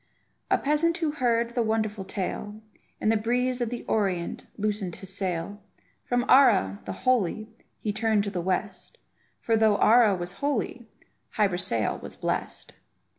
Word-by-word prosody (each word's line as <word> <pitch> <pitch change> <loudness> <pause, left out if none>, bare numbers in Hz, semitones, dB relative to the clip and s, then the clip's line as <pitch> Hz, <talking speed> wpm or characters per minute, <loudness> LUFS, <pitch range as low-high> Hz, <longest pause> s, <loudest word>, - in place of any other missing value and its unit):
A - - +4
peasant 310 +4 +1
who 320 -4 0
heard 235 -5 +1
of - - -15
the 240 - +1
wonderful 220 -2 -1
tale, 205 +2 -4 0.4
In - - +1
the 225 - +4
breeze 245 +3 0
of 240 - 0
the 245 0 -5
Orient 190 -5 -1
loosened 205 -4 -2
his 190 -1 -5
sail; 190 +2 -3 0.4
From 245 0 0
Ara, 100 - +5
the 95 - -4
holy, 220 -3 +1 0.3
he 210 - -3
turned 215 -1 +1
to 200 - -3
the 180 -3 -2
west, 190 +2 -3 0.4
For 225 - +1
though 220 -2 +4
Ara 220 -1 +5
was 175 0 -5
holy, 245 -1 -2 0.5
Hy 210 -2 +3
Brasail 175 - -1
was - - -8
blest. - - -3
215 Hz, 160 wpm, -26 LUFS, 190-240 Hz, 0.5 s, Ara